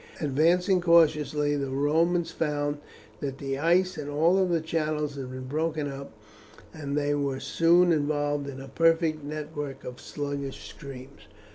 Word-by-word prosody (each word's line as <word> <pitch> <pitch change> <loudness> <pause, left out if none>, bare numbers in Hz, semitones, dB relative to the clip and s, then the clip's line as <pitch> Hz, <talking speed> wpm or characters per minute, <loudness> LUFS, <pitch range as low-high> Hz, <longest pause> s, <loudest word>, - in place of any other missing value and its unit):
Advancing 170 +6 +2
cautiously 150 -3 +3
the 140 -1 -2
Romans 165 +5 +1
found 145 -2 -1 0.4
that 135 -2 -4
the 135 -1 -3
ice 175 +2 +2
in 145 -1 -5
all 165 +6 +3
the 170 -2 +1
channels 155 -2 -1
had 135 -2 -6
been 130 0 -7
broken 155 +2 -1
up, 140 0 -7 0.6
and 145 -2 -4
they 145 0 +1
were 140 -2 -1
soon 170 +6 +4
involved 145 -2 0
in 135 -1 -8
a 135 - -8
perfect 165 +1 +2
network 145 -2 -5
of 125 0 -8
sluggish 140 -2 -5
streams. 135 -4 -11
150 Hz, 145 wpm, -27 LUFS, 140-165 Hz, 0.6 s, soon